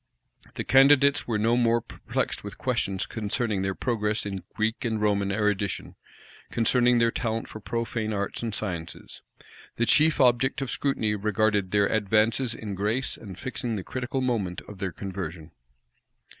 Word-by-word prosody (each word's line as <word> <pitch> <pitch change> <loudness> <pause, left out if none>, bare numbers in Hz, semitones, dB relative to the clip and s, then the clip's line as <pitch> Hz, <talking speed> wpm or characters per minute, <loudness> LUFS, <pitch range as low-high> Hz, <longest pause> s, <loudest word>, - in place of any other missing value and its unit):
The - - -2
candidates 140 +1 +5
were 115 -3 0
no 115 +3 +2
more 120 -1 +3
perplexed - - -4
with - - -8
questions 95 -1 -1
concerning 110 -1 -2
their 95 0 -1
progress 105 -4 -1
in 95 -2 -4
Greek 110 +1 -1
and 110 -3 -1
Roman 100 -2 +1
erudition; 100 -2 -1 0.5
concerning 120 +1 +3
their 115 0 +3
talent 115 -1 -2
for 110 - -9
profane 115 0 -3
arts 100 -1 -2
and 115 -3 -2
sciences: 90 -7 -5 0.5
the 120 - +1
chief 155 +5 +4
object 130 0 +3
of 135 -2 -3
scrutiny 115 -7 0
regarded 105 -1 +1
their 100 +1 +3
advances 110 +4 +1
in 105 -3 -6
grace, 105 +7 -1
and 95 -5 -10
fixing 125 -3 -3
the 95 - -4
critical 130 +3 -3
moment 110 -9 -1
of 105 -3 -12
their 95 -1 -2
conversion. 90 -4 -6
110 Hz, 155 wpm, -26 LUFS, 100-120 Hz, 0.5 s, candidates